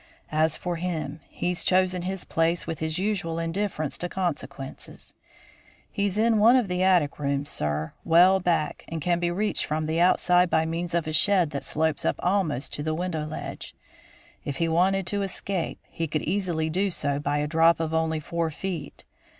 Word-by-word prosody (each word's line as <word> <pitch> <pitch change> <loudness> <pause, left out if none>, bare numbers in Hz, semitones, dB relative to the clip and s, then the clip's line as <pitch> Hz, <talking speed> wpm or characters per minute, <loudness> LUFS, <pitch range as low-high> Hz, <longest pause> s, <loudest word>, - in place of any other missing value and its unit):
As 155 0 +2
for 175 -2 -3
him, 165 -4 -3
he's 180 0 -2
chosen 185 -1 +2
his 190 +1 -4
place 165 +1 0
with 165 -1 -4
his 160 +1 -2
usual 185 -4 -1
indifference 165 -2 -2
to 175 - -3
consequences. 145 -7 -5 0.8
He's 200 -1 -1
in 225 0 +3
one 230 +4 +7
of 250 -5 +3
the 180 0 -1
attic 180 -7 +3
rooms, 140 0 -1
sir, 75 +1 -2
well 180 +3 +6
back, 175 -4 0
and 165 - -4
can 175 +2 +1
be 175 0 0
reached 205 +5 0
from 155 +1 -2
the 160 +2 -1
outside 180 0 +4
by 160 -1 +2
means 165 +1 -3
of 170 -1 +1
a 155 - -3
shed 180 -1 +4
that 140 - -4
slopes 160 -1 -1
up - - +1
almost 175 -8 0
to - - -3
the 155 +1 -1
window 165 -3 -2
ledge. 155 - -7 0.7
If 140 - -4
he 165 - +1
wanted 185 +3 +2
to 200 +3 -1
escape, 195 -2 -3
he 165 - -3
could 155 0 -2
easily 175 -4 -1
do 190 +5 0
so 145 -5 -2
by 145 0 -1
a 150 - 0
drop 165 +2 +4
of 160 -1 -2
only 160 -1 +1
four 165 +1 -2
feet. 165 -2 -6
165 Hz, 185 wpm, -26 LUFS, 155-185 Hz, 0.8 s, one